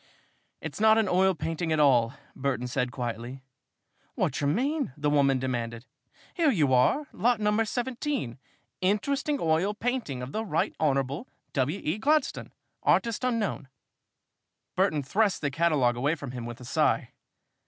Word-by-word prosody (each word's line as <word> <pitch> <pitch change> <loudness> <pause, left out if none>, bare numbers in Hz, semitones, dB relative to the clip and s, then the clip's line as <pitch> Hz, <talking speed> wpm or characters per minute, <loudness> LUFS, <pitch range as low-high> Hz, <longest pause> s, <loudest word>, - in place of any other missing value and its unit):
"It - - -5
is - - -7
not 220 0 +6
an 220 -2 +2
oil 185 +1 +3
painting 165 +1 -3
at 155 - +2
all," 125 -4 +4 0.2
Burton 135 -2 -1
said 125 0 -1
quietly. 120 +2 -5 0.7
"Wot - - -1
yer 140 - +1
mean?" 275 - 0
the 150 0 0
woman 140 -2 +3
demanded. 120 -2 -3 0.5
"Here 335 -4 +3
you 150 - +2
are 130 - +3
lot 235 +2 +2
number 210 +1 +2
17 245 - -3 0.4
'Interesting 275 +10 +1
oil 165 +6 +1
painting 220 - -2
of 125 - -6
the 220 - -2
Right 165 -7 -1
Honorable 140 - 0 0.3
W. 145 +8 0
E. 160 +8 -1
Gladstone, 300 +3 +1 0.3
artist 230 +1 +2
unknown.'" 225 - -1 1.1
Burton 170 -6 +2
thrust 200 +8 +1
the 145 -2 -1
catalogue 145 -6 +2
away 145 +6 +1
from 140 -5 -7
him 120 -2 -6
with 120 0 -8
a 125 - -10
sigh. 120 - +1
155 Hz, 155 wpm, -28 LUFS, 130-220 Hz, 1.1 s, not